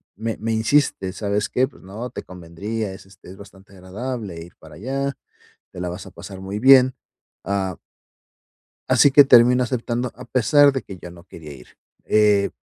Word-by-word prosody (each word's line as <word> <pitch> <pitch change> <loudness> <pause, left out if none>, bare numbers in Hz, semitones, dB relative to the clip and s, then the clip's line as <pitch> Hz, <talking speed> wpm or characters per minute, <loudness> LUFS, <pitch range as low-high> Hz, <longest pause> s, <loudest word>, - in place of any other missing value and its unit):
me 110 +2 -4
me 110 +1 -3
insiste: 110 -4 +1
"¿Sabes 100 +2 -2
qué? 130 +1 +1
Pues - - -19
no, 110 +7 -7
te - - -8
convendría. 95 +4 -6
Es, 95 - -13
este, 95 -2 -17
es 95 - -13
bastante 100 -1 -16
agradable 100 0 -7
ir 85 +2 -13
para 80 -1 -15
allá. 135 - -3 0.6
Te 90 - -10
la 90 - -3
vas 90 +1 -8
a - - -12
pasar 95 -2 -10
muy 95 +2 -6
bien". 130 0 +6 0.5
Ah 95 0 -2 1.1
Así 145 - +5
que 145 +1 +7
termino 125 -1 +5
aceptando 120 0 -3
a 125 - -11
pesar 140 +4 +4
de 135 - -3
que 95 - -11
yo 90 - -10
no 85 0 -15
quería 75 -5 -12
ir, 65 -3 -16 0.3
eh, 105 -2 +3
105 Hz, 180 wpm, -21 LUFS, 95-125 Hz, 1.1 s, que